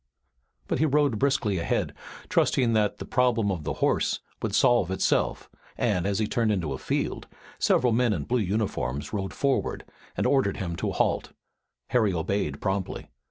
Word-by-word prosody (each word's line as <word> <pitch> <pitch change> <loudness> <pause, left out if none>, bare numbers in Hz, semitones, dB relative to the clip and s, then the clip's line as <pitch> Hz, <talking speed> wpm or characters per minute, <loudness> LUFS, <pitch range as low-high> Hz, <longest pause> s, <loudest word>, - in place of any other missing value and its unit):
But - - -1
he 155 - +3
rode 145 -6 +2
briskly 130 -9 +1
ahead, 85 - -1 0.3
trusting 120 -3 +2
that 105 -2 +1
the - - -7
problem 120 -5 +2
of 85 -5 -4
the - - -1
horse - - +1 0.2
would - - -1
solve 120 -7 +4
itself, 95 -9 0 0.3
and, 90 +1 +1
as 100 -1 0
he 110 - +1
turned 115 0 +1
a 70 -4 -3
field, - - -2 0.3
several 125 -2 +3
men 120 0 +3
in 85 -8 -1
blue 125 - 0
uniforms 95 - -2
rode 95 -2 -2
forward 140 -1 -1 0.3
and - - 0
ordered 135 -8 +2
him 85 -3 -3
to - - -1
halt. - - 0 0.6
Harry 110 -5 +2
obeyed 80 -3 -1
promptly. 95 -1 -3
105 Hz, 160 wpm, -26 LUFS, 95-125 Hz, 0.6 s, solve